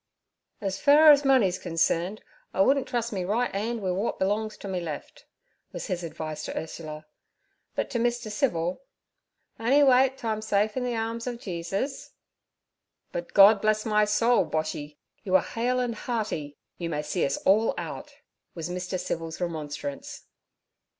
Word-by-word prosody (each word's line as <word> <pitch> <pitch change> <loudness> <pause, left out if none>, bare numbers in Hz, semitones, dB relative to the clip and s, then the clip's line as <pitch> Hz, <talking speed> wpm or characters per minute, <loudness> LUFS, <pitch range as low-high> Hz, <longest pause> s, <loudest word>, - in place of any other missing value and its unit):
'As 195 -1 -2
fer 300 +6 +8
ez 290 0 +5
money's 240 -10 +3
concerned, 175 +3 0 0.3
I 190 - +3
wudn't 270 +6 +3
trus' 235 -2 -2
me 190 -4 -2
right 225 +7 0
'and 220 +2 -2
wi' 185 - 0
wot 195 +5 -1
belongs 210 +2 -1
to - - -8
me 185 -2 -2
left' 160 -4 -7 0.4
was - - -5
his 180 -4 -3
advice 155 -2 -5
to - - -5
Ursula. 155 -1 -6 0.7
But - - -2
to 240 - -1
Mr. 240 -2 -1
Civil, 185 - 0 0.8
'On'y 265 +6 +4
wait 265 0 +5
t' 235 - -6
I'm 215 -1 -1
safe 210 0 +1
in 255 - -1
ther 240 -2 -1
arms 230 +2 -3
ov 245 - -2
Jeesis.' 195 +7 -4 1.0
'But - - -6
God 200 +1 +8
bless 215 0 +1
my 210 -1 +3
soul, 230 +3 +3
Boshy! 155 -1 -3 0.2
you 185 -1 0
are - - +5
hale 250 +2 -1
and 245 -2 -1
hearty. 210 - -3 0.2
You 170 -1 -3
may 150 -2 -2
see 150 - -1
us 140 - 0
all 215 +4 +3
out' - - -6 0.4
was 165 0 -5
Mr. 180 +1 -3
Civil's 165 -2 -4
remonstrance. 180 - -5
210 Hz, 165 wpm, -27 LUFS, 175-240 Hz, 1.0 s, fer